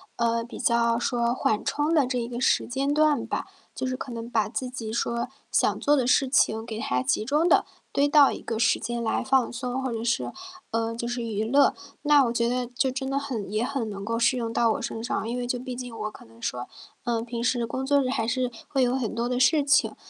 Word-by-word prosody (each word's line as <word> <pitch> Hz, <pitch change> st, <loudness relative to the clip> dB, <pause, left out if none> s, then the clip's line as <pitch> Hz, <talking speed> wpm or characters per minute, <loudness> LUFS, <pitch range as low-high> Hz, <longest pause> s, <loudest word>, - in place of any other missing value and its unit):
呃， 230 Hz, 0 st, +1 dB
比 240 Hz, -, -9 dB
较 235 Hz, -1 st, +2 dB
说 240 Hz, -1 st, 0 dB
缓 215 Hz, -4 st, 0 dB
冲 300 Hz, +3 st, 0 dB
的 285 Hz, -5 st, +4 dB
这 250 Hz, -1 st, -1 dB
一 235 Hz, -, -3 dB
个 240 Hz, 0 st, -5 dB
时 255 Hz, -, +2 dB
间 275 Hz, +3 st, 0 dB
段 300 Hz, -4 st, +3 dB
吧。 -, -, -3 dB, 0.3 s
就 260 Hz, -, -3 dB
是 255 Hz, -, -1 dB
可 260 Hz, -, -6 dB
能 230 Hz, 0 st, -6 dB
把 220 Hz, -4 st, +1 dB
自 255 Hz, +2 st, -3 dB
己 230 Hz, -3 st, -5 dB
说， 235 Hz, 0 st, -1 dB, 0.2 s
想 -, -, +2 dB
做 290 Hz, -, +3 dB
的 260 Hz, -4 st, +1 dB
事 270 Hz, +1 st, +3 dB
情 225 Hz, -4 st, +2 dB
给 225 Hz, -2 st, -5 dB
它 125 Hz, -, 0 dB
集 135 Hz, +11 st, 0 dB
中 300 Hz, +6 st, +2 dB
地 -, -, +5 dB, 0.3 s
堆 285 Hz, +1 st, +3 dB
到 290 Hz, -1 st, +6 dB
一 -, -, -5 dB
个 225 Hz, -2 st, -4 dB
时 230 Hz, -, +3 dB
间 235 Hz, +1 st, -3 dB
来 225 Hz, -, 0 dB
放 265 Hz, -1 st, +2 dB
松， 250 Hz, +1 st, -3 dB
或 260 Hz, -, -2 dB
者 230 Hz, 0 st, -3 dB
是 235 Hz, 0 st, 0 dB, 0.4 s
呃， 230 Hz, 0 st, -1 dB
就 235 Hz, +1 st, -4 dB
是 240 Hz, 0 st, -3 dB
娱 220 Hz, -1 st, -2 dB
乐。 275 Hz, +5 st, +4 dB, 0.3 s
那 295 Hz, -2 st, +6 dB
我 235 Hz, -, -1 dB
觉 235 Hz, 0 st, +1 dB
得 250 Hz, 0 st, -1 dB
就 255 Hz, +2 st, 0 dB
真 265 Hz, +1 st, -3 dB
的 275 Hz, -, 0 dB
很 240 Hz, -9 st, -3 dB
也 215 Hz, +3 st, 0 dB
很 255 Hz, -4 st, -2 dB
能 200 Hz, -1 st, -6 dB
够 230 Hz, +1 st, -1 dB
适 255 Hz, +2 st, +3 dB
用 230 Hz, -2 st, -2 dB
到 230 Hz, -1 st, +3 dB
我 -, -, -4 dB
身 225 Hz, -, -4 dB
上。 230 Hz, -2 st, -2 dB
因 240 Hz, -, -2 dB
为 245 Hz, -1 st, -3 dB
就 250 Hz, -, -1 dB
毕 255 Hz, +1 st, -6 dB
竟 245 Hz, -2 st, -7 dB
我 215 Hz, 0 st, -3 dB
可 -, -, -14 dB
能 115 Hz, 0 st, -19 dB
说， 125 Hz, +1 st, -3 dB, 0.4 s
呃， 230 Hz, -2 st, 0 dB
平 235 Hz, 0 st, -4 dB
时 250 Hz, +1 st, +2 dB
的 235 Hz, -, 0 dB
工 260 Hz, +4 st, -4 dB
作 280 Hz, +1 st, +3 dB
日 255 Hz, -, -1 dB
还 225 Hz, -3 st, -1 dB
是 255 Hz, 0 st, 0 dB, 0.2 s
会 270 Hz, -2 st, +1 dB
有 245 Hz, 0 st, +2 dB
很 235 Hz, -4 st, -2 dB
多 235 Hz, +1 st, -1 dB
的 250 Hz, 0 st, -1 dB
事 295 Hz, +3 st, +4 dB
情。 285 Hz, +1 st, +3 dB
240 Hz, 275 characters per minute, -26 LUFS, 230-265 Hz, 0.4 s, 到